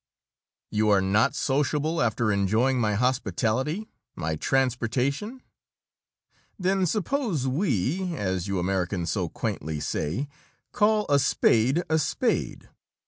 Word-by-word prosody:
You 105 0 +2
are 100 -2 +5
not 105 +9 +2
sociable, 150 +4 0
after 115 -1 +1
enjoying 110 +7 +2
my 105 -2 +1
hospitality, 130 - 0 0.3
my 80 -1 -2
transportation? 135 - -1 1.1
Then 190 0 +1
suppose 210 - -1
we 160 - 0
as 95 - -2
you 100 -1 -1
Americans 90 -1 -1
so - - -1
quaintly 75 +1 -4
say 80 - -2 0.4
call 215 -2 +2
a 145 -1 +4
spade 130 +3 +2
a 160 0 +2
spade! 150 - -1
130 Hz, 110 wpm, -26 LUFS, 100-160 Hz, 1.1 s, are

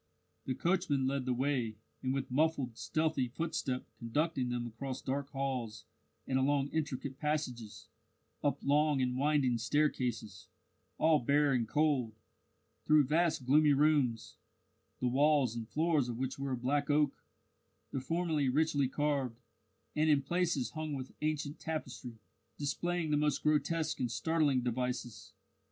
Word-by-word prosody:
The 130 - -2
coachman 170 -5 +1
led 135 -1 -1
the 130 - +1
way, 125 -4 0 0.3
and 130 - -1
with 135 -1 -2
muffled, 140 -4 +1
stealthy 155 -2 0
footstep 130 -2 -3
conducted 130 +2 -1
them 120 -1 -2
across 125 +3 -5
dark 140 +1 -3
halls 125 -5 -3 0.4
and 130 0 +1
along 140 +1 +2
intricate 140 -4 -3
passages, 130 -8 -3 0.6
up 145 -1 0
long 145 0 +3
and 125 -1 0
winding 135 -3 +2
staircases 120 -6 -1 0.5
all 155 -1 +4
bare 140 +2 +3
and 120 -3 +1
cold; 135 -5 +1 0.7
through 150 -1 +6
vast 155 -1 +1
gloomy 150 +3 +5
rooms, 135 -6 +2 0.6
the 125 - 0
walls 135 -2 +3
and 115 -2 -5
floors 155 -5 +1
of 120 - -4
which 130 +1 -3
were 140 -1 -2
of 120 -1 -5
black 145 +2 +1
oak, 145 -1 +1 0.7
the 135 - -2
former 165 +2 0
richly 145 0 +2
carved, 135 -4 -1 0.6
and 155 +1 +2
in 145 -2 +4
places 170 -4 0
hung 155 -1 -4
with 130 -2 -5
ancient 150 -1 -2
tapestry, 130 -7 -5 0.4
displaying 160 +3 -1
the 150 - +3
most 150 -1 +1
grotesque 155 +1 +1
and 125 - 0
startling 150 0 +1
devices. 125 -2 -3
140 Hz, 140 wpm, -33 LUFS, 125-150 Hz, 0.7 s, through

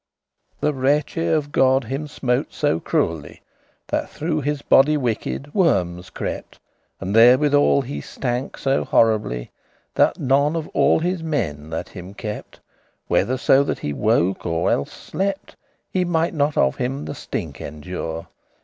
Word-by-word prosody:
The 150 - +1
wreche* 145 +5 +1
of 150 -2 0
God 130 0 +3
him 135 +6 -4
smote 130 -1 -1
so 145 - +1
cruelly, 80 -3 -1
*vengeance - - -29 0.5
That - - -1
through 155 0 -2
his 145 0 -2
body 150 +3 +5
wicked 135 +3 -3
wormes 90 - +1
crept, - - -6 0.4
And 95 +2 -3
therewithal 140 +4 +5
he 140 +3 -5
stank 125 +1 -3
so 135 0 +1
horribly 105 - +1 0.4
That - - +3
none 140 +4 +2
of 160 -2 -3
all - - +3
his 175 +2 -1
meinie* 75 - -2
that 80 - -4
him 95 +1 -10
kept, 105 -1 -6
*servants - - -31 0.4
Whether 130 +2 +2
so 135 +1 +4
that - - -2
he 75 - -4
woke 95 0 +1
or 85 0 0
elles 70 - 0
slept, 195 0 -4 0.4
Ne 185 - +2
mighte 170 -1 0
not 145 -1 0
of 65 - +2
him 135 +4 -2
the - - -5
stink - - -5
endure. 80 +2 -5
135 Hz, 155 wpm, -22 LUFS, 95-150 Hz, 0.5 s, body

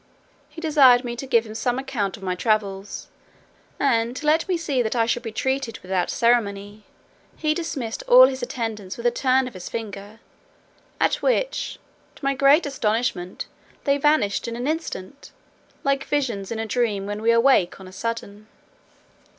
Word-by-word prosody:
He - - -11
desired 280 -6 +5
me 240 -1 -4
to 270 - -6
give 235 -3 +3
him 215 - -8
some 245 +2 -1
account 245 -7 -3
of 200 - -14
my 185 -1 -1
travels; 200 0 -1 0.7
and, 235 -3 +1
to 310 - -6
let 315 +2 +3
me 360 - +2
see 290 -6 0
that 225 0 -1
I 230 -1 +3
should 240 +1 0
be 225 -2 -6
treated 265 +1 -2
without 185 -1 -1
ceremony, 205 -3 0 0.5
he 305 -1 +1
dismissed 275 -9 -4
all 255 +1 +9
his 260 0 -2
attendants 215 -6 -4
with 235 - -8
a 240 - +4
turn 260 +1 +2
of 250 - -9
his 185 -2 -8
finger; 210 -1 -7 0.8
at - - +2
which, - - 0 0.4
to - - -9
my 275 - +2
great 275 +4 +4
astonishment, 220 -8 -2 0.4
they 280 -1 +2
vanished 280 -9 +2
in 230 - -4
an 245 +1 -4
instant, 285 - -4 0.5
like 275 0 +1
visions 235 -10 -2
in 230 - -2
a 225 - -2
dream 215 -4 -1
when 205 +1 -4
we 225 - +1
awake 230 -7 +3
on 190 - -11
a - - -11
sudden. 215 0 -5
235 Hz, 175 wpm, -23 LUFS, 210-275 Hz, 0.8 s, all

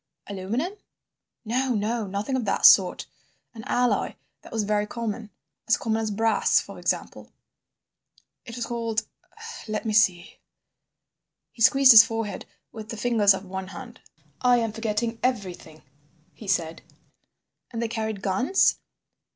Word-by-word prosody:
"Aluminum?" 210 - -3 0.7
"No, 250 +2 0
no, 215 +1 -2
nothing 200 +7 -3
of 255 - -1
that 195 - 0
sort. - - +6 0.5
An 225 -2 -10
alloy 245 0 0 0.3
that - - -15
was 220 -2 -1
very 210 0 0
common—as 225 0 -4
common 225 -1 -1
as 220 - -2
brass, 225 +2 +2
for - - -9
example. - - -3 1.1
It 230 -2 -9
was 240 -1 -3
called—let 230 - -5
me 220 - -1
see—" 185 -5 +1 1.1
He 230 - -14
squeezed 270 +3 +7
his 220 -2 +11
forehead 225 -4 -5 0.2
with 220 -1 -10
the 225 - -6
fingers 210 -3 +3
of 190 - -8
one 190 0 -6
hand. 235 +5 -11 0.4
"I 245 -1 +4
am 225 -2 -1
forgetting 225 +1 -3
everything," 185 -10 -4 0.5
he 215 - -12
said. 165 -4 -1 0.9
"And 230 - -6
they 230 - -1
carried 220 -3 -4
guns?" 250 - +2
220 Hz, 135 wpm, -25 LUFS, 205-235 Hz, 1.1 s, his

